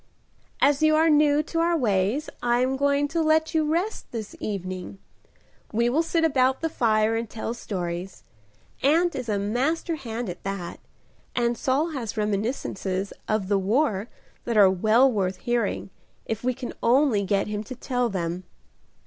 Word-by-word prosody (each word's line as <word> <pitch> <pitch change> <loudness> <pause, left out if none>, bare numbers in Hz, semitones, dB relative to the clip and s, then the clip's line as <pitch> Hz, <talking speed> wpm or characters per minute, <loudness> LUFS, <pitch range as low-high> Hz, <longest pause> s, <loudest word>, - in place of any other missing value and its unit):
"As 285 +1 +3
you 310 0 +5
are 320 +1 +4
new 295 0 +4
to 330 +2 -3
our 335 0 +2
ways 220 +3 +1
I 240 0 +2
am 260 +1 +1
going 280 +1 +2
to 330 +1 0
let 315 +1 +2
you 310 -1 +1
rest 365 +7 -1
this 220 -3 -6
evening. 185 -2 -5 0.7
We 235 +2 +2
will 305 +6 +3
sit 330 0 0
about 265 -4 +2
the 325 - 0
fire 220 -5 +2
and 225 -1 -3
tell 225 +1 -4
stories. 180 -5 -5 0.6
Aunt 335 +5 +3
is 255 -3 -5
a 205 - +1
master 270 - -1
hand 240 -3 -5
at 180 - -6
that, 195 -3 -5 0.6
and 240 -1 +1
Saul 275 +7 0
has 235 -7 -5
reminiscences 200 -2 -2
of 215 -3 0
the 200 0 +2
war 215 +1 +1 0.4
that 235 -2 0
are 195 -2 +7
well 220 +8 +4
worth 190 -4 0
hearing 240 -5 -1 0.3
if 225 0 -4
we 255 0 0
can 255 -1 -6
only 240 -3 +3
get 195 0 +1
him 210 0 -4
to 255 - -7
tell 250 -1 -1
them." 180 -2 -3
240 Hz, 165 wpm, -25 LUFS, 205-290 Hz, 0.7 s, are